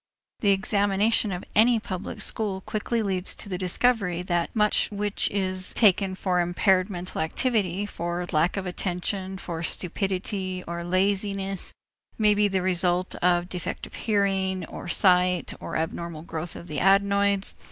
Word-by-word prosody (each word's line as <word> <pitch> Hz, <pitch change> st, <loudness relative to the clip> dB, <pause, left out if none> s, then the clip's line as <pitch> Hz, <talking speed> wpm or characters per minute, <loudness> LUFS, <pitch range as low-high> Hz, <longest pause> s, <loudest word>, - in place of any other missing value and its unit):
The 205 Hz, -, +2 dB
examination 200 Hz, +2 st, +2 dB
of 180 Hz, -1 st, -4 dB
any 230 Hz, +2 st, +5 dB
public 190 Hz, -3 st, -6 dB
school 200 Hz, -4 st, -1 dB
quickly 220 Hz, +3 st, -2 dB
leads 190 Hz, -2 st, -2 dB
to -, -, -5 dB
the 185 Hz, -2 st, -3 dB
discovery 185 Hz, -2 st, +1 dB
that 175 Hz, -2 st, 0 dB
much 210 Hz, -1 st, +3 dB
which 205 Hz, 0 st, 0 dB
is 185 Hz, -1 st, -2 dB
taken 195 Hz, -3 st, +4 dB
for 185 Hz, -1 st, 0 dB
impaired 185 Hz, +2 st, +2 dB
mental 180 Hz, -3 st, -4 dB
activity, 200 Hz, +1 st, 0 dB
for 175 Hz, -2 st, -4 dB
lack 165 Hz, +5 st, +1 dB
of 195 Hz, -, -3 dB
attention, 185 Hz, +1 st, -3 dB
for 170 Hz, -3 st, -5 dB
stupidity, 185 Hz, +1 st, -2 dB
or 170 Hz, 0 st, -4 dB
laziness 195 Hz, +1 st, 0 dB, 0.5 s
may 210 Hz, -1 st, +4 dB
be 205 Hz, 0 st, +3 dB
the 190 Hz, -2 st, -1 dB
result 180 Hz, 0 st, +2 dB
of 175 Hz, 0 st, +2 dB
defective 180 Hz, -2 st, -6 dB
hearing 195 Hz, -3 st, 0 dB
or -, -, -9 dB
sight 180 Hz, -1 st, +3 dB
or -, -, -6 dB
abnormal 160 Hz, 0 st, -4 dB
growth 165 Hz, 0 st, -5 dB
of -, -, -9 dB
the 155 Hz, -4 st, -3 dB
adenoids. 200 Hz, +1 st, +2 dB
190 Hz, 145 wpm, -25 LUFS, 180-200 Hz, 0.5 s, any